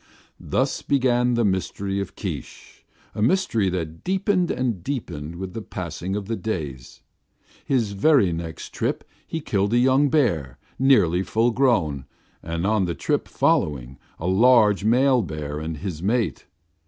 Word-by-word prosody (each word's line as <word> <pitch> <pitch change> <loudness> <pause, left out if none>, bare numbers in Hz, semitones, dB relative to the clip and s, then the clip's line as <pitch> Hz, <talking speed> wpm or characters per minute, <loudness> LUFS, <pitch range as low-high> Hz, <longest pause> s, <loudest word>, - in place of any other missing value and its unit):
Thus - - -1
began 125 -3 +2
the 120 -1 +2
mystery 95 +1 -1
of 100 - -5
Keesh, - - -7 0.3
a - - -4
mystery 115 - +2
that 80 -3 -4
deepened 190 -1 +1
and 115 -9 -2
deepened 85 - -5
with 95 +1 -6
the 115 - -5
passing 90 -1 -5
of 105 -1 -3
the 115 +3 -2
days. 75 - -5 0.6
His 120 -6 0
very 100 - +3
next 80 -1 -6
trip - - -2 0.2
he 165 - -4
killed 100 -5 0
a - - +4
young 130 +3 +4
bear, 85 - +1 0.2
nearly 110 -10 +4
full 110 +5 +1
grown, 105 - +1 0.4
and 85 +2 -3
on 105 -2 +2
the 85 -1 -3
trip - - -1
following, 65 -3 0 0.2
a 80 - -6
large 105 +1 +4
male 125 +3 +4
bear 75 -5 -5
and 80 0 -5
his 80 0 -5
mate. 105 - -1
100 Hz, 150 wpm, -23 LUFS, 85-125 Hz, 0.6 s, a